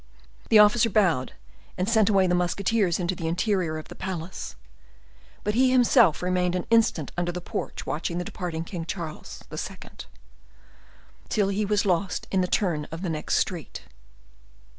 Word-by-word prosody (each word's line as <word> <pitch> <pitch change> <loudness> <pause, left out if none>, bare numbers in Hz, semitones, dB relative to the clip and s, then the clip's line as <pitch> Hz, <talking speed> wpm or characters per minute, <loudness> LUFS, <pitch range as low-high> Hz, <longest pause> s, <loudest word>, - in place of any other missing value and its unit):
The 220 - +7
officer 210 +2 +6
bowed 180 -11 +2 0.4
and 185 - -1
sent 220 -2 +3
away 195 -2 +4
the 180 - +1
musketeers 180 +1 +1
into 180 +1 -1
the 165 -2 -4
interior 180 -2 0
of 155 - -8
the - - -9
palace. 180 -2 -6 0.9
But 210 - 0
he 255 +3 +4
himself 235 - +4
remained 180 0 +1
an 180 - -2
instant 220 -10 +2
under 175 0 -1
the 180 - -5
porch 180 - -5
watching 155 +5 -3
the 180 - -1
departing 165 -3 -4 0.2
Charles 155 - -6
II., - - -5 1.5
till 205 -2 +1
he 205 +2 0
was 205 0 +1
lost 185 0 0
in 190 - +2
the 180 - 0
turn 170 -7 0
of 165 +4 -8
the 180 - -1
next 155 -1 -1
street. 170 -7 -2
180 Hz, 160 wpm, -26 LUFS, 170-205 Hz, 1.5 s, The